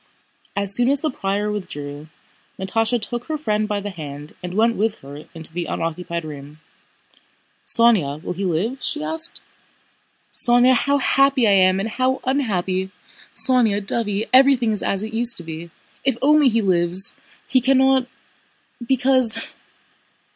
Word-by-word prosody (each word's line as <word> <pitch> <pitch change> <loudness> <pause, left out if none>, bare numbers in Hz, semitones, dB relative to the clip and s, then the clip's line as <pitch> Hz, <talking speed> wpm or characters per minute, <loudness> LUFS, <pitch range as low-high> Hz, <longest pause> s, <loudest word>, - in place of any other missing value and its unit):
As 200 0 0
soon 245 +4 +1
as 280 0 +3
the 310 - -1
prior 205 -2 -2
withdrew, 150 -7 -7 0.5
Natásha 225 +5 0
took 240 +2 -5
her 310 -1 -3
friend 215 -7 -1
by 210 -1 -2
the 205 0 -6
hand 150 -3 -9
and 180 0 -6
went 230 +2 +2
with 215 +1 -1
her 145 +2 -11
into 160 0 -6
the 175 0 -4
unoccupied 170 0 -4
room. 145 0 -10 1.1
"Sónya, 200 - +3
will - - -4
he 190 +3 -5
live?" 195 +9 -2
she 305 -1 -2
asked. 320 +2 0 0.9
"Sónya, 245 +1 +5
how 280 +3 +1
happy 275 -2 +2
I - - +4
am, 185 -1 +4
and 200 - -2
how 255 +3 -1
unhappy!... 190 -8 -1 0.5
Sónya, 225 -3 +4
dovey, 210 0 -1
everything 260 -3 +5
is 210 - -1
as 195 +1 -1
it 220 +1 -7
used 235 +1 +4
to 175 - +1
be. 165 +1 -8 0.3
If 270 -3 0
only 295 -1 +5
he 230 -1 0
lives! 180 0 +1 0.3
He 255 - +2
cannot... 265 0 +3 0.8
because... 250 -2 +1
215 Hz, 150 wpm, -21 LUFS, 180-255 Hz, 1.1 s, Sónya